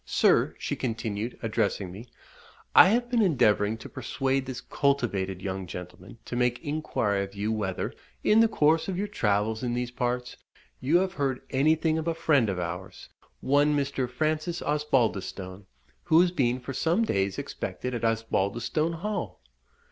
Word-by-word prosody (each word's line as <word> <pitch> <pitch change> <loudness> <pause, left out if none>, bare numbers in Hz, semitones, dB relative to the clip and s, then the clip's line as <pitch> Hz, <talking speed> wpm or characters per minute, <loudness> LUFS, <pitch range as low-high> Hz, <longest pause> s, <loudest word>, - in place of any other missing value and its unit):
Sir," - - +3
she - - -3
continued, 110 -1 -3
addressing 105 -4 -1
me, 105 +7 -10 0.7
"I - - +9
have 240 +3 +2
been 240 -1 +2
endeavouring 110 - +3
to 115 - -10
persuade 135 -1 -2
this 130 -2 -5
cultivated 100 -10 -1
young 95 -1 -4
gentleman 90 +5 -9
to - - -5
make 125 0 +1
inquiry 145 -10 -1
of 100 +1 -9
you 105 +2 -1
whether, 105 -4 -2 0.3
in 215 - +5
the 230 - +6
course 160 -6 +2
of 190 -2 -2
your 205 +2 -1
travels 105 - 0
in 120 -1 -1
these 125 0 -2
parts, 125 0 -2 0.4
you 150 +7 +3
have 185 +1 0
heard 135 -6 -1
anything 155 +3 +2
of 160 - -4
a 165 - 0
friend 145 -9 +3
of 95 - -2
ours, 90 +2 -6 0.3
one 145 +2 +3
Mr. 135 -3 -1
Francis 155 +6 -1
Osbaldistone, 110 -10 -1 0.4
who 165 -1 +5
has 180 -1 +3
been 130 -7 +1
for 130 +2 -6
some 165 - +1
days 95 - 0
expected 125 - -4
at 120 - -4
Osbaldistone 115 +7 0
Hall?" 210 0 -3
125 Hz, 160 wpm, -27 LUFS, 105-155 Hz, 0.7 s, I